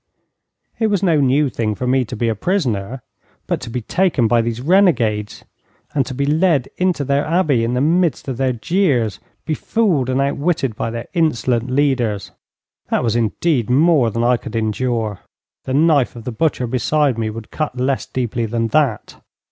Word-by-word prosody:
It 225 Hz, -, +2 dB
was 200 Hz, -3 st, 0 dB
no 165 Hz, -5 st, +3 dB
new 140 Hz, +2 st, +3 dB
thing 110 Hz, -4 st, -2 dB
for 125 Hz, -, -4 dB
me 130 Hz, 0 st, +2 dB
to 125 Hz, -, -7 dB
be 115 Hz, +1 st, -1 dB
a 115 Hz, -, +1 dB
prisoner; 125 Hz, -, -2 dB, 0.4 s
but -, -, -2 dB
to 130 Hz, -, -7 dB
be 125 Hz, +1 st, -3 dB
taken 165 Hz, -, +1 dB
by 120 Hz, 0 st, +3 dB
these 115 Hz, 0 st, -3 dB
renegades, 125 Hz, -, +1 dB, 0.5 s
and 135 Hz, -4 st, 0 dB
to 130 Hz, -, -5 dB
be 140 Hz, +2 st, 0 dB
led 155 Hz, -2 st, +2 dB
into 180 Hz, -5 st, +1 dB
their 140 Hz, +1 st, +1 dB
Abbey 155 Hz, -7 st, +1 dB
in 120 Hz, +2 st, -1 dB
the 125 Hz, -, +1 dB
midst 165 Hz, -1 st, +1 dB
of 130 Hz, -3 st, -3 dB
their 130 Hz, 0 st, +1 dB
jeers, 125 Hz, -, 0 dB, 0.3 s
befooled 160 Hz, -, 0 dB
and 130 Hz, +1 st, 0 dB
out 140 Hz, +1 st, 0 dB
witted 140 Hz, -7 st, -1 dB
by 115 Hz, -, -3 dB
their 115 Hz, +1 st, -6 dB
insolent 130 Hz, -7 st, 0 dB
leaders 125 Hz, -7 st, 0 dB, 0.6 s
that -, -, +1 dB
was 115 Hz, -2 st, 0 dB
indeed 120 Hz, +3 st, 0 dB
more 140 Hz, -2 st, +4 dB
than 115 Hz, +2 st, -2 dB
I 125 Hz, +1 st, +3 dB
could 115 Hz, -, -9 dB
endure. 110 Hz, -1 st, -1 dB, 0.5 s
The 130 Hz, -, -3 dB
knife 150 Hz, -4 st, +3 dB
of 115 Hz, -, -9 dB
the 125 Hz, -, -4 dB
butcher 130 Hz, +1 st, 0 dB
beside 130 Hz, +1 st, 0 dB
me 110 Hz, -1 st, -1 dB
would 110 Hz, 0 st, -8 dB
cut 155 Hz, -5 st, -3 dB
less 130 Hz, +1 st, -1 dB
deeply 120 Hz, -2 st, -2 dB
than 115 Hz, +1 st, -1 dB
that. 130 Hz, -5 st, 0 dB
130 Hz, 185 wpm, -19 LUFS, 115-155 Hz, 0.6 s, more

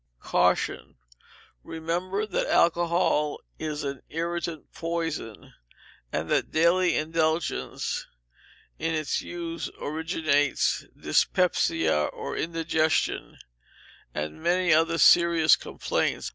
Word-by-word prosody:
Caution. -, -, 0 dB, 0.7 s
Remember 175 Hz, +5 st, -2 dB
that 210 Hz, -, -2 dB
alcohol 170 Hz, -3 st, +2 dB, 0.2 s
is 150 Hz, -1 st, -3 dB
an 140 Hz, -1 st, -4 dB
irritant 170 Hz, -1 st, -4 dB
poison, 165 Hz, -9 st, -4 dB, 0.6 s
and -, -, -2 dB
that -, -, +1 dB
daily 175 Hz, +3 st, +3 dB
indulgence 160 Hz, +1 st, -1 dB, 0.7 s
in 165 Hz, 0 st, -1 dB
its 155 Hz, -2 st, -1 dB
use 170 Hz, -1 st, -5 dB
originates 155 Hz, -2 st, 0 dB
dyspepsia, 75 Hz, -2 st, +2 dB
or -, -, -5 dB
indigestion, 160 Hz, -1 st, 0 dB, 0.7 s
and 75 Hz, -, -5 dB
many 175 Hz, 0 st, +3 dB
other 165 Hz, +1 st, +3 dB
serious 170 Hz, -3 st, +6 dB
complaints. -, -, -2 dB
165 Hz, 90 wpm, -26 LUFS, 155-170 Hz, 0.7 s, serious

